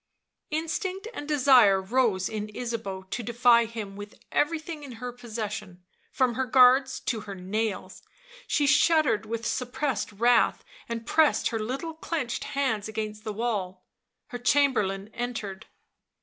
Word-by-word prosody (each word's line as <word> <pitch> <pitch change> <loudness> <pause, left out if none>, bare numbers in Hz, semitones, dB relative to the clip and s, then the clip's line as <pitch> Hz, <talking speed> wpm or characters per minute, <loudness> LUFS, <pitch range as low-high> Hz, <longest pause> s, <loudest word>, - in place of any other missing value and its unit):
Instinct 365 +6 -3
and 290 - -6
desire 255 -9 +5
rose 200 -2 +1
in 215 -1 -4
Ysabeau 225 -6 -4
to - - -2
defy 235 +1 +4
him 220 -3 -7
with 205 +1 -9 0.2
everything 315 0 -1
in 270 -3 -8
her 245 +2 -6
possession, 215 -6 -6 0.3
from 255 -2 +1
her 260 +2 -1
guards 260 +2 +5
to 230 - -2
her 205 -2 -8
nails; 195 +2 -3 0.5
she 295 - +2
shuddered 295 -7 +3
with 230 +1 -4
suppressed 250 -1 -2
wrath, 235 +3 +3 0.3
and 230 -1 -4
pressed 315 +4 +3
her 225 - -2
little 270 +9 -4
clenched 315 -6 -3
hands 260 -7 -1
against 215 -1 -5
the 215 - -3
wall. 205 -5 -3 0.4
Her 245 - -6
Chamberlain 230 -7 +1
entered. 225 -5 -5
235 Hz, 135 wpm, -27 LUFS, 210-265 Hz, 0.5 s, desire